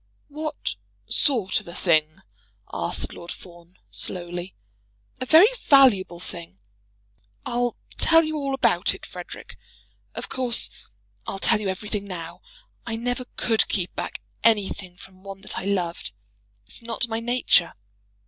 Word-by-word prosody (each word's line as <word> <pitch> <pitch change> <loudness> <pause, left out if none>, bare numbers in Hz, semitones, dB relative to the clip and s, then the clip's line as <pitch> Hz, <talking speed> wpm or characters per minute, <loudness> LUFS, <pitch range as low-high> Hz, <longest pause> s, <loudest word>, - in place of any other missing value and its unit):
"What 305 +1 -4 0.3
sort 230 -10 +2
of - - -15
a 170 - -8
thing?" 155 -3 +2 0.5
asked - - -1
Lord 170 0 -8
Fawn 175 0 -13
slowly. 175 0 -5 0.6
"A 255 - -3
very 330 - +8 0.2
valuable 220 - +5
thing. 170 - -9 0.9
I'll 245 0 -1 0.2
tell 325 0 +7
you 310 0 -2
all 275 -2 -1
about 270 - +2
it, - - -11
Frederic. - - -10 0.6
Of - - -4
course 250 -3 +2 0.6
I'll 195 - -3
tell 210 - +4
you 200 - -1
everything 205 +2 -3
now. 170 -4 -7 0.4
I 225 - -3
never 245 +2 -2
could 225 -2 +2
keep 185 -3 -1
back - - -5 0.2
anything 200 -4 +1
from 185 0 -15
one 195 0 -9
that 210 - -4
I 185 - -6
loved. 180 - -2 0.5
It's - - -9
not 230 0 0
my 225 0 -2
nature. 230 -7 +3
200 Hz, 140 wpm, -24 LUFS, 180-245 Hz, 0.9 s, very